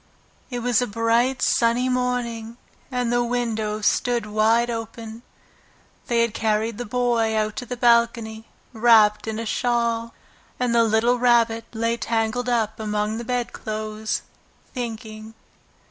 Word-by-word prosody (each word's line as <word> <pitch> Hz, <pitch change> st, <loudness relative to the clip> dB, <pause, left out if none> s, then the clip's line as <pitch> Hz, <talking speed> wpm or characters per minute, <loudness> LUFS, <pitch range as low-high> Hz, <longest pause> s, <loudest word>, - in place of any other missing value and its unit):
It 245 Hz, -2 st, -4 dB
was 245 Hz, -1 st, +2 dB
a 245 Hz, -, 0 dB
bright, 230 Hz, +5 st, +1 dB
sunny 235 Hz, +2 st, +2 dB
morning, 245 Hz, -2 st, -2 dB, 0.3 s
and 245 Hz, -2 st, -1 dB
the 240 Hz, 0 st, +2 dB
windows 220 Hz, -3 st, -2 dB
stood 240 Hz, -3 st, +1 dB
wide 220 Hz, +3 st, +2 dB
open. 225 Hz, -1 st, -6 dB, 0.9 s
They 235 Hz, -1 st, +2 dB
had 235 Hz, -2 st, -1 dB
carried 220 Hz, 0 st, -1 dB
the 245 Hz, -, -3 dB
Boy 235 Hz, -1 st, +1 dB
out 215 Hz, -, +2 dB
on 215 Hz, -, -5 dB
to 245 Hz, -, -6 dB
the 250 Hz, -, -5 dB
balcony, 235 Hz, -2 st, +2 dB, 0.3 s
wrapped 220 Hz, -2 st, +4 dB
in 220 Hz, -1 st, -3 dB
a 230 Hz, -, -4 dB
shawl, 235 Hz, 0 st, -1 dB, 0.4 s
and 250 Hz, -1 st, +1 dB
the 235 Hz, 0 st, +5 dB
little 230 Hz, +2 st, +2 dB
Rabbit 235 Hz, -2 st, +3 dB
lay 230 Hz, +1 st, -1 dB
tangled 230 Hz, +2 st, -1 dB
up 220 Hz, -3 st, 0 dB
among 210 Hz, +1 st, -2 dB
the -, -, -5 dB
bedclothes, 220 Hz, -3 st, -3 dB, 0.5 s
thinking. 220 Hz, -3 st, -6 dB
230 Hz, 140 wpm, -23 LUFS, 220-240 Hz, 0.9 s, the